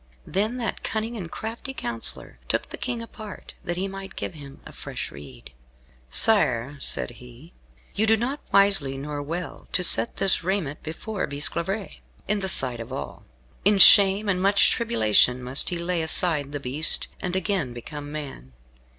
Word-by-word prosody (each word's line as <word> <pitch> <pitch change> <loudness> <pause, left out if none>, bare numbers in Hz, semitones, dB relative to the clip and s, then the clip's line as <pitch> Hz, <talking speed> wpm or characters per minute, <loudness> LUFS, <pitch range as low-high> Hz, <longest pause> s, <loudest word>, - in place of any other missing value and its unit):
Then 215 +6 -2
that 235 -2 -4
cunning 225 +2 -3
and 180 -7 -6
crafty 230 +8 -6
counsellor 115 - -4
took - - -1
the - - -7
King 240 -2 -4
apart, 215 -3 -10
that 175 0 -3
he 190 +2 -2
might 195 0 -9
give - - -5
him 140 -3 -12
a - - -11
fresh - - -7
rede. 65 -4 -13 0.6
"Sire," 145 - +3
said - - -2
he, 125 +7 -15 0.4
"you 220 +2 0
do 220 0 +4
not 260 +6 -3
wisely, 195 -9 +3
nor 145 +1 -5
well, 165 +5 -6
to 180 - +1
set 115 -9 +5
this 195 -2 +2
raiment 180 -6 -2
before 190 +6 -5
Bisclavaret, 170 +7 -4 0.3
in 210 0 0
the 190 -1 -2
sight 125 -7 +2
of 115 +2 -8
all. 135 - -7 0.4
In 205 +1 +4
shame 200 +2 +7
and 185 -2 0
much 200 +1 +4
tribulation 125 - +2
must 125 +3 +4
he 175 - -3
lay 170 0 -2
aside 160 -3 +1
the 145 - -4
beast, 140 +4 +2
and 180 0 -3
again 190 - -1
become 145 +5 -8
man. 135 - -8
175 Hz, 165 wpm, -24 LUFS, 135-200 Hz, 0.6 s, shame